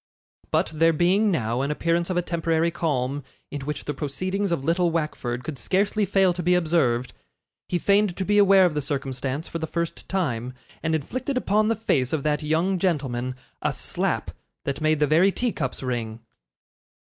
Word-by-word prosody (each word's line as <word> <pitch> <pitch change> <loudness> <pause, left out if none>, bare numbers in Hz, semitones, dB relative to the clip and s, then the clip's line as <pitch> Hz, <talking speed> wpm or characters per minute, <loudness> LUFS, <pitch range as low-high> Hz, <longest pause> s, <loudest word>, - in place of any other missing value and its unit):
But - - +1
there 165 +1 +4
being 185 +7 +3
now 120 - 0
an 140 - -1
appearance 170 +3 0
of 185 - -1
a 175 - +1
temporary 165 -1 0
calm, 145 -4 -1 0.3
in 145 - -4
which 150 - -4
the 150 - -2
proceedings 185 +8 -2
of 165 -6 -1
little 170 +2 +2
Wackford 150 -7 -2
could 140 0 -5
scarcely 200 +2 +1
fail 190 -1 +3
to 175 - -4
be 180 +1 +3
observed, 145 -8 +1 0.6
he 180 - +1
feigned 200 +1 +2
to 190 - -1
be 205 +1 +3
aware 195 -2 +7
of 175 - +1
the 150 - -1
circumstance 135 +1 -3
for 165 - -5
the 160 - -3
first 170 +1 -4
time, 130 -10 -1 0.3
and 160 -1 0
inflicted 255 - -3
upon 215 -3 +2
the 230 - +2
face 140 - 0
of 150 -3 0
that 150 -1 +1
young 165 +5 +1
gentleman 130 -8 -1 0.3
a - - +1
slap - - -2 0.3
that 140 +2 -3
made 155 -1 +2
the 150 - +4
very 165 +7 +4
tea 245 +4 -1
cups 135 -6 -4
ring. 115 -3 -3
160 Hz, 185 wpm, -25 LUFS, 140-185 Hz, 0.6 s, aware